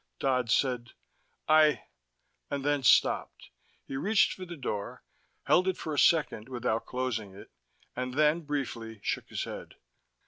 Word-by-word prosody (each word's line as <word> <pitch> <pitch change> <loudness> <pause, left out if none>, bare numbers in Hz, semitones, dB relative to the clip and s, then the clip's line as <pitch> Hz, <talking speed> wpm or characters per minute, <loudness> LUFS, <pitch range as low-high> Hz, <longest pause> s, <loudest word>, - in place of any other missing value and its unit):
Dodd 125 - 0
said: 125 -1 0 0.5
"I 155 -1 +5 0.3
" - - -48
and 140 -1 -3
then 145 -1 +1
stopped. 130 - +2 0.3
He - - -6
reached 205 +8 +3
for 185 - -8
the 170 -1 -8
door, 105 -7 -5 0.4
held 185 +1 +3
it 190 - 0
for 155 - -4
a 145 - +1
second 145 -8 +2
without 120 -3 -2
closing 120 -6 -3
it, 100 - -13 0.4
and 125 +1 -4
then, 155 +3 +3
briefly, 120 -7 -4
shook - - -2
his - - -3
head. - - -8
135 Hz, 150 wpm, -29 LUFS, 120-155 Hz, 0.5 s, I